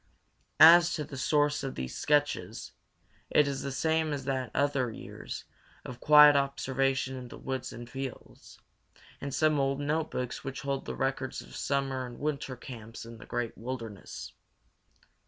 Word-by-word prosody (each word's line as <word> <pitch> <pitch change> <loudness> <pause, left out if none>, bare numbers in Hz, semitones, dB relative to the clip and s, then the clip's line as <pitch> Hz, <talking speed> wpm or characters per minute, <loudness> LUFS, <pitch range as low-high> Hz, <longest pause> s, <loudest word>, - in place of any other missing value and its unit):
As 170 +2 +9
to 150 - -2
the 140 - -9
source 145 +2 +1
of 135 - -4
these 65 -1 -5
sketches, 125 -8 0 0.6
it 150 - +4
is 140 -1 -2
the 140 - -4
same 160 +3 +1
as 135 -2 -4
that 130 -2 -1
of 110 - -21 0.2
the 140 - 0
others 110 - -9
years - - -8 0.4
of 125 -1 -8
quiet 150 0 +8
observation 135 -1 0
in 125 -1 -7
the - - -10
woods 130 -1 -4
and 120 0 -8
fields, 135 +1 -8 0.6
and 140 - -4
some 155 +1 +2
old 135 0 +1
notebooks 145 -4 -2
which 135 0 -5
hold 140 -1 -2
the - - -4
records 135 0 -2
of - - -13
summer 135 -2 -1
and 120 - -10
winter 140 -3 -3
camps 115 -3 -9
in 115 -1 -11
the - - -12
great 120 -2 -3
wilderness. 115 -4 -7
135 Hz, 165 wpm, -30 LUFS, 125-145 Hz, 0.6 s, As